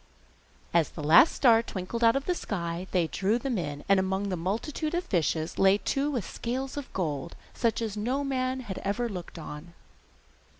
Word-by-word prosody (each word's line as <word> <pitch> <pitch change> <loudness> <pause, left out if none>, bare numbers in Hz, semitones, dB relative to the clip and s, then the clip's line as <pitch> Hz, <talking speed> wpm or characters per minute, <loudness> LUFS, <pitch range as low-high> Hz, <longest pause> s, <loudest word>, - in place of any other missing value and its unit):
As 170 -2 +3
the 155 - -8
last 165 - +7
star 230 -4 +5
twinkled 230 +2 -4
out 230 +1 +6
of 275 0 -1
the 360 - +1
sky 175 - -4
they 180 -3 +2
drew 195 +7 0
them 245 -3 -2
in, 145 -3 -4
and 195 -1 +5
among 190 +1 -1
the 185 - -1
multitude 230 - -2
of 350 - 0
fishes 165 - -1
lay 195 +1 +6
two 275 +7 -1
with 245 -10 -2
scales 260 +3 -4
of 285 -2 -6
gold, 165 -3 -3 0.2
such 230 -1 0
as 215 -2 -3
no 250 +7 -1
man 260 -1 -1
had 205 -7 -6
ever 220 +5 -1
looked 180 -5 -7
on. 160 +2 -9
205 Hz, 185 wpm, -28 LUFS, 175-255 Hz, 0.2 s, last